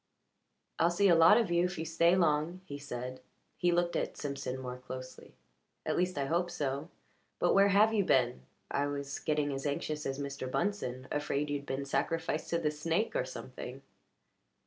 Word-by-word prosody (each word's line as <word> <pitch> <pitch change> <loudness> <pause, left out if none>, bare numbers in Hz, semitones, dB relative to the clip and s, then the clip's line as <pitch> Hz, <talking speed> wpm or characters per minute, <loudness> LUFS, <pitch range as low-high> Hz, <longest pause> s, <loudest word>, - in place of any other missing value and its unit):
"I'll 170 - +5
see 195 +3 +3
a - - +7
lot 165 +6 +8
of 225 -7 +1
you, 170 0 +3
if 180 - -3
you 160 - -3
stay 170 +2 +3
long," 165 +1 +1
he 145 -3 -7
said. 130 -2 -6 0.3
He 175 -1 +2
looked 175 0 +1
at - - -2
Simpson 140 -2 -4
more 125 -1 -5
closely. 130 0 -9 0.5
"At - - 0
least, 180 -1 0
I 140 - 0
hope 175 +4 0
so. 145 -1 -3 0.5
But - - +3
where 200 0 +6
have 210 +3 +5
you 205 -2 +3
been? 125 - +2 0.3
I 140 0 +1
was 140 -1 -4
getting 150 -2 0
as 135 +2 -3
anxious 150 +1 -2
as 135 0 -2
Mr. 140 -2 -4
Bunsen 130 -4 -2
afraid 145 0 -1
you'd 140 -1 -3
been 135 +1 -2
sacrificed 155 +3 -1
to 170 - +1
the 155 -3 0
snake 165 - -1
or - - +1
something." - - -8
150 Hz, 185 wpm, -32 LUFS, 140-175 Hz, 0.5 s, lot